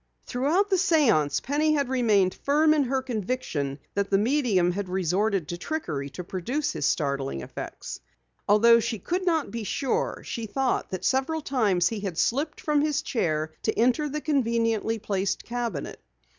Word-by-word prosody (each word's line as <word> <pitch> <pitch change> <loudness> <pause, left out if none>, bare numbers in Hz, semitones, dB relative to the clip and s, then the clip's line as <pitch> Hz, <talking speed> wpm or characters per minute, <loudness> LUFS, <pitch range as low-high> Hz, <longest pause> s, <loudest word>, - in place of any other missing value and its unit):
Throughout 325 +11 +1
the 380 - +4
séance 295 - +3
Penny 300 +3 +1
had 285 -3 +1
remained 215 -8 +2
firm 305 +2 +3
in 295 -3 +2
her 260 +1 -1
conviction 210 - -3 0.2
that 200 0 -1
the 195 - +4
medium 215 -6 +2
had 195 +1 -4
resorted 190 0 0
to 175 - -4
trickery 155 - -3
to 180 +7 -7
produce 235 - -2
his - - 0
startling 140 - -1
effects. - - -7 0.5
Although 230 +3 +6
she 230 0 -2
could 360 - -3
not 320 -4 +1
be 230 -1 -4
sure, 265 +5 -1
she 230 -1 -4
thought 265 +3 -1
that 185 -1 -4
several 275 +5 +1
times 210 - +2
he 225 - -4
had 195 -5 -4
slipped 285 - 0
from 300 -1 +1
his 300 0 0
chair 155 - -1
to 220 - -1
enter 255 +6 +2
the 300 +2 -3
conveniently 230 -6 +1
placed 195 -3 -2
cabinet. 235 -10 -4
230 Hz, 165 wpm, -26 LUFS, 185-285 Hz, 0.5 s, Although